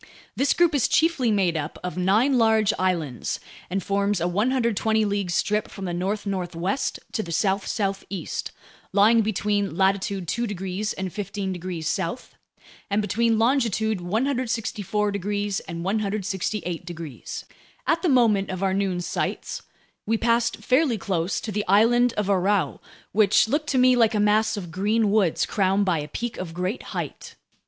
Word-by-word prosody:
This 275 - +2
group 345 -2 +4
is 280 -5 +3
chiefly 315 -7 +2
made 190 -5 +2
up 155 0 -3
of 180 -3 -4
nine 210 +9 +3
large 220 -2 +4
islands 170 -9 -1 0.3
and 190 +1 -2
forms 200 0 0
a 170 - 0
120 220 +1 +1
league 200 -2 -1
strip 210 +4 0
from 195 - -7
the 175 - -3
north 195 +4 -2
northwest 185 +3 -2
to 220 - -1
the 170 - -7
south 195 +3 +1
southeast, 195 -4 -3 0.4
lying 215 +3 +5
between 205 -3 -1
latitude 195 -1 +1
2 235 +7 -1
degrees 195 +1 -3
and 190 -2 -5
15 195 -1 -3
degrees 175 -3 -5
south, 170 +9 -3 0.6
and 200 +1 +1
between 225 +2 +1
longitude 225 -4 +1
164 220 -1 -1
degrees 205 0 -2
and 170 -1 -7
168 195 -3 -2
degrees. 170 -6 -7 0.4
At 330 0 +2
the 360 - +1
moment 225 -7 +3
of 185 0 -3
our 190 -1 +2
noon 190 -2 0
sights, - - -3 0.5
we 225 +1 +2
passed 235 +1 +1
fairly 260 -2 +3
close 185 -3 -1
to 220 - -5
the 210 0 -1
island 235 +5 +4
of 210 - -1
Aurou, 195 0 +1 0.3
which 210 +1 +4
looked 295 +5 -1
to 265 - +1
me 255 0 +5
like 230 -2 +3
a - - +2
mass 215 +1 +3
of 175 -4 -6
green 205 +4 +1
woods 200 -6 +2
crowned 195 0 +1
by 175 -4 +1
a 150 - -5
peak 235 +9 -4
of 170 -3 -6
great 185 +6 -2 0.2
height. - - -6
205 Hz, 160 wpm, -24 LUFS, 185-220 Hz, 0.6 s, lying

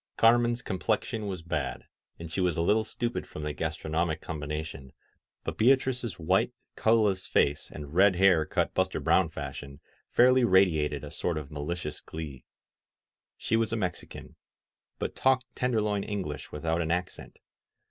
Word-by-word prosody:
Car* 115 +1 +6
men's 120 0 -1
complexion 110 +3 -1
was 90 -4 -5
bad, 70 -6 -3 0.3
and 85 -1 -8
she 95 - -1
was 90 -3 +1
a 85 - +1
little 110 +5 +3
stupid 120 +2 -3
from 75 - -7
the 75 0 -2
gastronomic 80 +1 -2
combination, 75 -3 -6 0.5
but - - -5
Beatrice's 125 -4 +2
white, 95 +8 +2 0.2
colorless 110 -4 +2
face 70 0 +1
and 75 -1 -9
red 95 +2 +5
hair 90 -3 +5
cut - - -1
Buster - - 0
Brown - - +3
fashion 70 0 -7 0.3
fairly 125 +1 +5
radiated 80 - +3
a - - -7
sort 85 -3 -2
of 75 -2 -6
malicious 75 +1 -4
glee. 75 -6 -8 0.9
She 115 - 0
was 115 -1 +1
a - - 0
Mexican, 90 -4 -5 0.6
but - - -4
talked 130 -2 +1
Tenderloin 105 -5 0
English 95 -8 -5
without 80 +3 -1
an 80 - -2
accent. 90 +1 -3
90 Hz, 150 wpm, -28 LUFS, 75-110 Hz, 0.9 s, Car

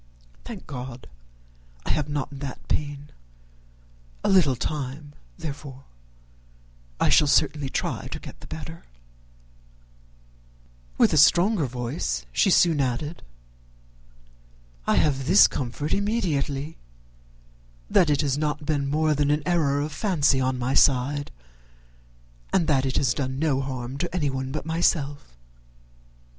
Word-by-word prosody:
Thank - - -8
God 125 -2 -7 0.8
I - - 0
have 150 -1 -1
not 145 -1 -4
that 135 -2 -7
pain. 145 -1 -3 1.1
A - - +1
little 175 -9 +4
time, 145 +2 -5 0.2
therefore 140 -2 -7 1.2
I - - +3
shall 150 - +5
certainly 145 -1 +2
try - - -3
to - - -6
get - - -11
the - - -12
better 160 +1 -8 1.5
" - - -30
With - - +4
a - - +3
stronger 170 +3 +4
voice 120 - -3
she 125 - +3
soon 165 -5 +4
added, 140 +5 -2 1.7
"I - - +3
have 135 -3 +1
this 190 +5 +7
comfort 140 +3 -3
immediately, 160 -9 -1 1.1
that 165 - +3
it 145 -1 +2
has 140 -1 0
not 150 0 -2
been 145 -2 0
more 155 +1 +2
than 145 -1 +1
an 150 0 +1
error 150 -5 +1
of 150 +1 -3
fancy 150 -7 +2
on 130 0 0
my 125 +1 -1
side, 140 +2 +3 1.2
and 180 -4 +2
that 135 -3 +2
it 130 - -1
has 130 - +2
done 130 -2 -3
no 140 -3 +1
harm 130 0 -5
to 175 +2 -3
anyone 135 -5 -1
but 150 +1 -4
myself." 145 - -1
145 Hz, 130 wpm, -25 LUFS, 130-155 Hz, 1.7 s, this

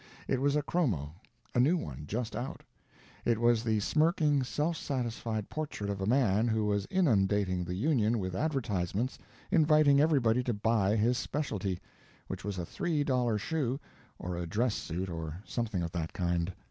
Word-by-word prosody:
It 130 - 0
was 140 +1 +2
a 150 - +1
chromo; 100 - 0 0.4
a - - +2
new 150 +9 +4
one, 75 - -6
just 115 +4 -3
out. 130 - -5 0.6
It 115 -2 +2
was 120 -1 +3
the 110 -2 +1
smirking, 155 - +2
self 150 +6 -1
satisfied 115 -7 -3
portrait 145 -10 -4
of 100 -1 -4
a 95 - -1
man 115 -3 +3
who 110 -2 +1
was 100 -1 0
inundating 100 - +2
the 90 +1 -4
Union 115 -1 +2
with 95 -3 -3
advertisements 115 - -1 0.3
inviting 155 -5 +5
everybody 130 -7 +3
to 120 - 0
buy 105 -1 +2
his 120 +4 +2
specialty, 100 - -2 0.5
which - - -6
was 100 -1 -3
a 90 - -3
three 150 - -1
dollar 125 -5 +1
shoe 135 +2 -1 0.4
or 90 0 -4
a 85 -1 -3
dress 110 +7 +1
suit 90 +1 -3
or 80 -1 -5
something 110 -7 -2
of 85 - -3
that 85 -2 -3
kind. 85 0 0
115 Hz, 170 wpm, -31 LUFS, 95-140 Hz, 0.6 s, inviting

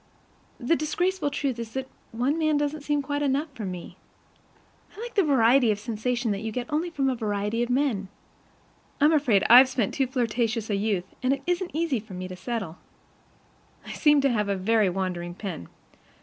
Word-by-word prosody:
The 260 +6 +2
disgraceful 350 +2 -1
truth 275 -4 -2
is 230 -1 -6
that 265 0 -3 0.2
one 255 +8 0
man 310 -2 +2
doesn't 295 +1 -2
seem 290 0 -1
quite 285 +1 -2
enough 285 +2 0
for 220 -5 -6
me. 180 -2 -7 1.0
I - - -10
like 475 +1 -6
the 405 - +4
variety 260 - +4
of 210 - +1
sensation 235 +2 -2
that 200 - -2
you 220 0 -4
get 245 +2 -3
only 325 +4 0
from 280 -5 -1
a 265 - +2
variety 210 -1 -2
of 240 - -1
men. 245 -7 0 0.9
I'm 300 +3 +5
afraid 250 -10 +3
I've 255 +3 +9
spent 240 -6 -1
too 270 -2 0
flirtatious 230 -3 -1
a - - +2
youth, 200 -3 -1 0.2
and 255 +1 +2
it 275 - -5
isn't 355 -2 -2
easy 315 -6 0
for 205 -3 -11
me 185 0 -5
to 185 - -8
settle. 185 -3 -5 1.1
I - - -7
seem 295 -2 +4
to 275 -1 +2
have 210 -3 0
a 200 - +1
very 210 +1 +2
wandering 175 -2 -3
pen. 185 - -6
245 Hz, 190 wpm, -26 LUFS, 210-290 Hz, 1.1 s, I've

